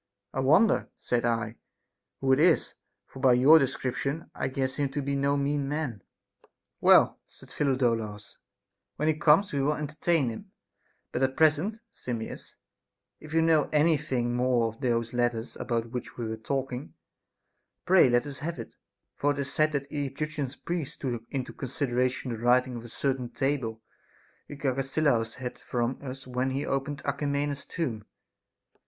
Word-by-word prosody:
I - - -2
wonder, 160 +12 +4
said 120 -1 -1
I, 115 -1 -1 0.6
who 135 0 +3
it 130 - +3
is, 165 0 +3 0.3
for 135 - -12
by 130 -2 +5
your 140 +6 +7
description 140 +3 -2
I - - -2
guess 130 0 -2
him 145 -2 0
to 145 - -1
be 140 +1 -1
no 140 +1 +1
mean 140 0 0
man. 145 -9 -3 0.4
7. - - -29 0.3
Well, - - +6
said - - -17
Phidolaus, 115 -7 -1 0.6
when 150 - -1
he - - +4
comes 155 +5 +4
we 140 - 0
will 150 +2 +2
enter 150 0 -5
tain 165 -8 +3
him; 110 - -9 0.6
but 125 - -2
at 135 - +4
the 130 - -15
present, 160 +8 +2
Simmias, 115 -3 -6 0.6
if 155 - -12
you 165 0 +3
know 160 -3 +3
any 155 +2 +4
thing 125 -5 -1
more 125 -2 +2
of 115 +4 -13
those 115 -3 0
letters 120 -1 -1
about 115 -1 -2
which 125 -1 -6
we 120 -2 -3
were 110 - -3
talking, 130 +3 -4 0.9
pray 180 -7 +6
let 120 0 +3
us 140 -2 -6
have 165 +1 -4
it; 115 - -8 0.4
for 145 - +1
it - - -9
is 140 -1 -3
said 155 0 +3
that 140 -1 -2
the 145 -1 -2
Egyptian 145 0 -3 0.2
priests 170 -5 -3
took 120 -4 -3
into 130 -2 -4
consideration 130 -1 -1
the 115 - -4
writing 125 +2 +3
of 115 - -6
a - - -9
certain 130 0 -2
table 125 -6 -2 0.6
which 145 0 -8
Agesilaus 135 -3 +1
had 125 -1 -6
from 120 +1 -2
us 135 -1 -7
when 130 +1 -1
he 135 +2 -2
opened 140 +1 -2
Alcmena's 140 0 -1
tomb. 125 - -3
135 Hz, 170 wpm, -28 LUFS, 120-145 Hz, 0.9 s, your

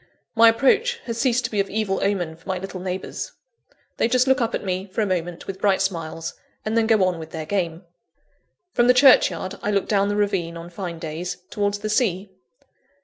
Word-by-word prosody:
My 230 0 +7
approach 365 - +3
has 230 -1 -4
ceased 245 0 +2
to - - -3
be 210 - -1
of 195 - 0
evil 200 -2 -1
omen 180 -5 -1
for 165 +4 -15
my 185 - 0
little 190 0 -6
neighbours. 185 +1 -5 0.6
They - - +2
just 250 +1 +3
look 265 0 +3
up 230 -1 0
at - - -4
me, 185 0 -2
for 195 +3 -2
a - - +2
moment, 175 -3 -3
with 195 0 -7
bright 195 -2 +3
smiles, 165 -4 -3 0.3
and 215 +1 -1
then 225 -1 +3
go 220 -4 +4
on 180 -2 0
with 160 -1 -8
their 160 -1 -5
game. 170 -2 -2 0.9
From 240 0 +3
the 250 - +6
churchyard, 200 - +4
I - - -2
look 200 -2 +1
down 200 -1 +2
the 205 - 0
ravine, 195 -5 0
on 170 +1 -9
fine 175 -2 -5
days, 160 +2 -5
towards 205 -1 0
the 215 +1 -4
sea. 200 -4 0
195 Hz, 210 wpm, -23 LUFS, 175-220 Hz, 0.9 s, My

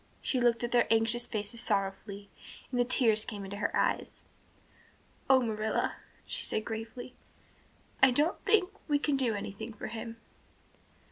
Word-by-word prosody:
She 260 - 0
looked 240 -1 +2
at 240 - -2
their 240 -2 +3
anxious 230 +2 +3
faces 215 +1 -3
sorrowfully 200 -1 -1 0.4
and 250 - -1
the - - +5
tears 235 -4 +4
came 205 -2 -6
into 200 +1 -6
her - - 0
eyes. - - -1 1.1
"Oh, 265 -1 +7
Marilla," 220 -1 -1 0.3
she - - -3
said 215 - -1
gravely. 225 +3 -6 0.9
"I 265 - +8
don't 295 +7 +1
think 405 -4 +3 0.2
we 295 -2 +3
can 290 0 0
do 250 -5 +1
anything 205 +3 -6
for 210 - -7
him." 230 +1 -7
230 Hz, 150 wpm, -30 LUFS, 215-250 Hz, 1.1 s, I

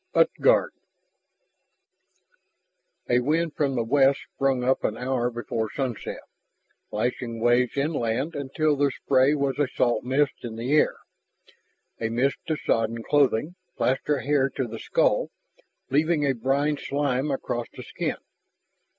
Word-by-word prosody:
8. - - +6
UTGARD - - +4 2.4
A 120 - +5
wind 155 +5 0
from 140 -3 0
the 120 - +1
west 135 +3 +3
sprang 135 -2 +1
up 130 +1 +1
an 110 - -1
hour 125 -1 0
before 115 -2 -3
sunset, 130 -5 -4 0.7
lashing 115 +1 -2
waves 120 +3 +2
inland 140 0 -1
until 145 +2 0
their 145 0 +2
spray 135 +2 +2
was 140 -1 -1
a 145 - +3
salt 120 -2 0
mist 135 +3 +1
in 115 -2 -6
the 120 +4 -3
air, 155 - +4 1.0
a 115 - -1
mist 125 +4 +1
to 155 - 0
sodden 115 -3 -1
clothing, 145 +2 +2 0.2
plaster 135 +2 0
hair 140 -1 +2
to 130 - -3
the 115 0 -7
skull, - - +1 0.6
leaving 150 +1 +2
a 135 - +2
brine 140 +5 0
slime 140 0 -1
across 125 -3 -3
the - - -10
skin. - - -3
135 Hz, 135 wpm, -25 LUFS, 120-145 Hz, 2.4 s, 8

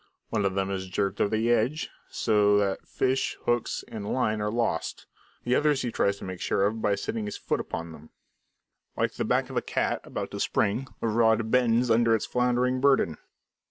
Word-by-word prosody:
One 105 -3 0
of 95 -1 0
them 95 0 0
is 95 -1 -3
jerked 100 +1 -1
over 105 +1 +2
the 115 +2 +1
edge, 120 +7 +1 0.2
so 105 -2 +3
that 100 -2 -1
fish, 130 0 0
hooks, 120 -1 0
and 105 -2 -5
line 110 -4 0
are 105 - 0
lost; 115 -8 -2 0.4
the 120 - 0
other 150 +3 +4
he 130 -4 -2
tries 100 -2 +1
to - - -11
make 95 -1 -6
sure 100 - +1
of 110 +2 -1
by 105 -1 +2
setting 105 +2 -3
his 105 - -5
foot - - -1
upon 85 0 -5
it. 80 0 -14 0.9
Like - - +1
the - - -2
back - - +1
of - - -4
a - - +2
cat - - -1
about - - -5
to - - -5
spring, 120 +7 0
the - - 0
rod 110 0 +2
bends 120 -1 +3
under 115 0 +4
its 110 - -2
floundering 125 +1 +1
burden. 130 - +3
110 Hz, 200 wpm, -27 LUFS, 100-120 Hz, 0.9 s, other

